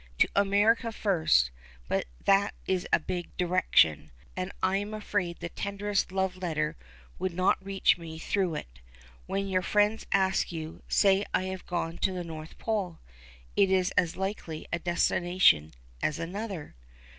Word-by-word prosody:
To - - +5
America 205 +4 +3
first, 160 - +2 0.4
but - - -1 0.2
that 200 +1 +3
is 185 -1 -1
a - - +5
big 175 +2 -5
direction, 175 - +3 0.3
and 185 +1 -3
I 185 +1 +3
am 205 +2 -4
afraid 185 -5 -2
the 170 - -5
tenderest 200 +1 -2
love 190 -1 -1
letter 155 -4 -1 0.4
would 185 -2 -2
not 185 +1 +2
reach 195 -2 +2
me 160 -1 -8
through 180 0 0
it. - - -8 0.5
When 195 0 -1
your 185 -1 +1
friends 210 +4 +1
ask 190 -2 +2
you, 160 -1 -6
say 195 -1 +4
I - - +1
have 190 -1 -5
gone 170 -2 -3
to 190 - +1
the 180 -1 -3
North 160 -1 -8
Pole; 200 -7 -2 0.6
it 195 - +4
is 185 -1 +2
as 170 -1 +1
likely 190 -5 -4
a 170 - +1
destination 175 - +3 0.3
as 150 - 0
another." 185 0 -5
185 Hz, 155 wpm, -29 LUFS, 165-195 Hz, 0.6 s, To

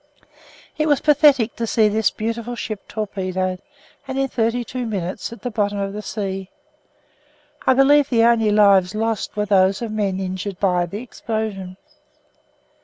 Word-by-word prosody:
It 310 - +2
was 290 -3 +3
pathetic 285 -6 +4
to 230 - -2
see 220 -1 +3
this 215 +1 +2
beautiful 230 +2 -4
ship 215 -3 -6
torpedoed 185 -3 -3 0.5
and 265 0 -4
in 270 0 +1
thirty 235 +1 0
two 250 0 -5
minutes 190 -3 -4
at 235 - -11
the 245 - -3
bottom 205 -1 -1
of 195 0 -3
the 210 - -5
sea. 195 -2 -4 1.2
I 260 - +5
believe 285 +2 +5
the 230 -3 +3
only 230 -2 +4
lives 200 -3 +4
lost 225 -1 -2
were 210 - +1
those 195 -1 +3
of 225 - -4
men 200 -3 -1
injured 190 0 -4
by 180 -3 +1
the 205 +7 -6
explosion. 215 -6 -5
215 Hz, 160 wpm, -21 LUFS, 195-235 Hz, 1.2 s, I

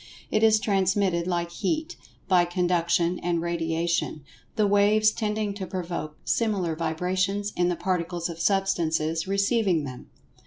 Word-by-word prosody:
It 215 - +2
is 220 -1 +5
transmitted, 190 -3 +1
like 170 -1 -1
Heat, 315 - -2 0.3
by 180 -2 +5
Conduction 175 -1 +1
and 175 -1 -1
Radiation, 165 -2 -1 0.3
the 215 -2 +2
"waves" 205 +1 +4
tending 210 -2 -2
to 195 -2 -6
provoke 170 -5 -5
similar 195 -8 0
vibrations 185 +5 -1
in 175 0 +2
the 175 - 0
Particles 175 -1 -2
of 170 -1 -7
Substances 165 -4 0
receiving 200 -4 +1
them. 130 -3 -8
180 Hz, 130 wpm, -26 LUFS, 170-200 Hz, 0.3 s, is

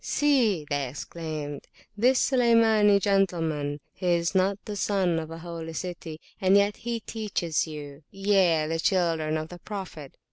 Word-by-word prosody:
See, 240 - +2
they 140 -2 -1
exclaimed, 150 0 -6 0.3
this 250 +5 +3
Sulaymani 225 -5 +4
gentleman, 165 -8 0
he 180 - -5
is 170 0 +1
not 190 +1 +2
the 210 - -5
Son 190 -5 +1
of 160 -1 -6
a 165 - -7
Holy 165 -1 -7
City, 170 -2 -6 0.2
and 190 +1 +5
yet 200 +1 +2
he 235 -1 -4
teacheth 200 -8 -2
youye, 160 +3 0
the 165 +1 -2
children 165 -4 +1
of 155 +1 -5
the 175 - -10
Prophet! 185 -8 -8
175 Hz, 145 wpm, -26 LUFS, 160-205 Hz, 0.3 s, and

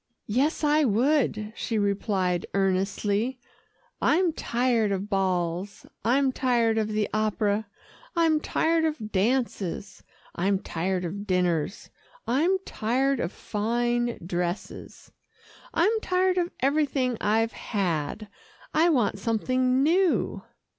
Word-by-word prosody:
"Yes, 270 +10 0
I 300 +1 +4
would," 230 -3 +1
she 225 - -2
replied 195 -3 0
earnestly, 200 +5 0 0.6
"I'm 345 +1 +3
tired 235 -5 +1
of 195 +2 -3
balls, 185 0 -1 0.2
I'm 260 +4 +3
tired 235 -4 +1
of 215 - 0
the 215 -1 0
opera, 215 0 0 0.5
I'm 325 -2 +3
tired 325 +1 +1
of 300 -9 -2
dances, 200 -3 -1 0.3
I'm 195 +3 +1
tired 180 0 -2
of 200 +4 -5
dinners, 180 -1 0 0.3
I'm 320 +10 +2
tired 260 +4 0
of 170 - -2
fine 240 +3 -1
dresses 175 +1 -4 0.6
I'm 435 +3 +2
tired 370 -2 +1
of 350 0 0
everything 275 -2 +1
I've 225 +2 +1
had. 190 -1 -2 0.5
I 325 +3 +4
want 240 -9 +1
something 255 +4 +1
new." 350 +3 +2
225 Hz, 110 wpm, -26 LUFS, 200-275 Hz, 0.6 s, I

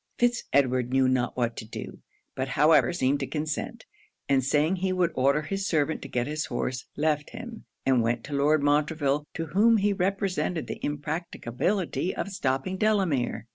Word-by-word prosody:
Fitz 240 0 +1
Edward 130 -3 +2
knew 135 0 +3
not 130 -1 0
what 120 -2 0
to - - -5
do; 110 - -8 0.3
but 130 0 -2
however 155 +5 +4
seemed 140 -4 +1
to 135 - -3
consent; 150 - -4 0.4
and 135 -2 +3
saying 150 +7 +2
he 190 +1 -1
would 180 -2 +1
order 140 +4 +2
his 195 +4 -3
servant 155 -1 0
to - - -7
get 120 -1 -1
his 150 +1 -2
horse, 130 0 -3
left 150 0 0
him, 235 -2 -9 0.2
and 130 -2 +4
went 115 +1 0
to 145 - -7
Lord 145 +1 +3
Montreville, 145 0 +1
to 165 - -2
whom 225 +4 +5
he 205 0 +2
represented 190 -3 -1
the - - -7
impracticability 160 - -2
of - - -3
stopping 185 -1 -1
Delamere. 175 - +1
150 Hz, 175 wpm, -27 LUFS, 135-185 Hz, 0.4 s, whom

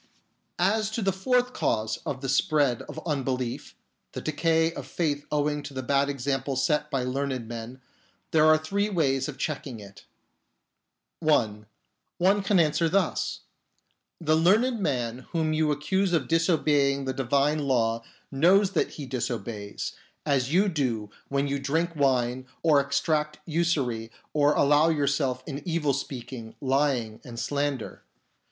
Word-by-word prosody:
As 210 +4 +2
to 225 - -1
the 195 -1 +2
fourth 250 +6 +1
cause 110 - 0
of 135 -2 -3
the 135 - -3
spread 145 -4 +2
of - - -6
unbelief 130 -5 -2 0.2
— - - -50
the - - -5
decay 160 +1 +1
of - - -7
faith 145 -4 -2
owing 150 0 0
to 140 -1 -9
the 130 - -3
bad 140 +2 +2
example 135 0 -2
set 150 +3 +1
by 135 -4 -1
learned 130 -2 -2
men 120 +2 -7 0.3
— - - -39
there 155 -1 +5
are 155 0 +7
three 200 +7 -1
ways 135 -8 +1
of 150 -2 -7
checking 140 -6 -4
it. 100 -1 -13 1.1
(1) 110 -10 +1 0.5
One 195 +3 +3
can 195 -1 +2
answer 160 +1 +2
thus: 190 0 0 0.4
" - - -48
The 155 -1 +2
learned 215 +9 +3
man 125 - -2
whom 160 -2 +1
you 155 -1 +2
accuse 175 +6 0
of 150 -7 +1
disobeying 145 -4 +2
the 130 - -1
divine 140 +3 +1
law 115 -5 +1 0.3
knows 185 +8 +4
that 185 - 0
he 145 - -6
disobeys, 115 -5 -4 0.3
as 135 -3 +1
you 190 +5 +4
do 120 - -1 0.2
when 140 0 0
you 140 0 -1
drink 165 +5 -1
wine 130 -3 +1 0.2
or 150 -4 +5
exact 150 +2 0
usury 145 -9 0 0.2
or 150 0 +3
allow 145 +3 +4
yourself 140 -4 0
in 145 -1 -5
evil 165 -5 0
speaking, 125 -4 -6
lying, 130 -5 0
and 115 -2 -8
slander. 140 -3 -2
145 Hz, 150 wpm, -27 LUFS, 130-160 Hz, 1.1 s, are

